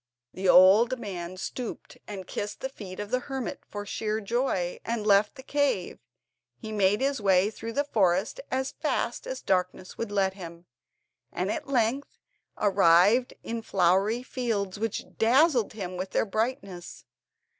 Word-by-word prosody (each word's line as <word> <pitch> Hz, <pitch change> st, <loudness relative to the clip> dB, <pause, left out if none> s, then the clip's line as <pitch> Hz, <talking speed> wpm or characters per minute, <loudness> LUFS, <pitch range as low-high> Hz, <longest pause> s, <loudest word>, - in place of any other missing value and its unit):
The 190 Hz, 0 st, -1 dB
old 210 Hz, +9 st, +7 dB
man 185 Hz, -5 st, -6 dB
stooped 240 Hz, +5 st, -6 dB
and 195 Hz, -3 st, -7 dB
kissed 205 Hz, +3 st, -5 dB
the 265 Hz, -, -3 dB
feet 195 Hz, -8 st, -9 dB
of 205 Hz, +1 st, -5 dB
the 255 Hz, -, +2 dB
hermit 265 Hz, -1 st, -5 dB
for 205 Hz, 0 st, -6 dB
sheer 215 Hz, +1 st, -2 dB
joy, 205 Hz, -5 st, -1 dB
and 230 Hz, -2 st, -3 dB
left 205 Hz, +2 st, +4 dB
the 265 Hz, -, -11 dB
cave. 285 Hz, -11 st, 0 dB, 0.6 s
He 220 Hz, -, -8 dB
made 205 Hz, 0 st, +2 dB
his 275 Hz, -3 st, 0 dB
way 195 Hz, +1 st, +3 dB
through 230 Hz, +1 st, -7 dB
the 285 Hz, -, +1 dB
forest 200 Hz, -, +1 dB
as 260 Hz, 0 st, -1 dB
fast -, -, -2 dB
as -, -, -5 dB
the -, -, -35 dB
darkness 185 Hz, 0 st, -1 dB
would 230 Hz, -3 st, -3 dB
let 195 Hz, -2 st, +1 dB
him, 170 Hz, -3 st, -10 dB, 0.7 s
and 185 Hz, +3 st, -2 dB
at -, -, -5 dB
length 255 Hz, +1 st, 0 dB, 0.4 s
arrived 200 Hz, +4 st, +4 dB
in 230 Hz, 0 st, -4 dB
flowery 195 Hz, +4 st, +2 dB
fields, 215 Hz, -7 st, -2 dB
which 225 Hz, -1 st, -2 dB
dazzled 255 Hz, +1 st, +4 dB
him 185 Hz, -4 st, -5 dB
with 185 Hz, +1 st, -4 dB
their -, -, +2 dB
brightness. 210 Hz, -4 st, -4 dB
210 Hz, 155 wpm, -27 LUFS, 190-245 Hz, 0.7 s, old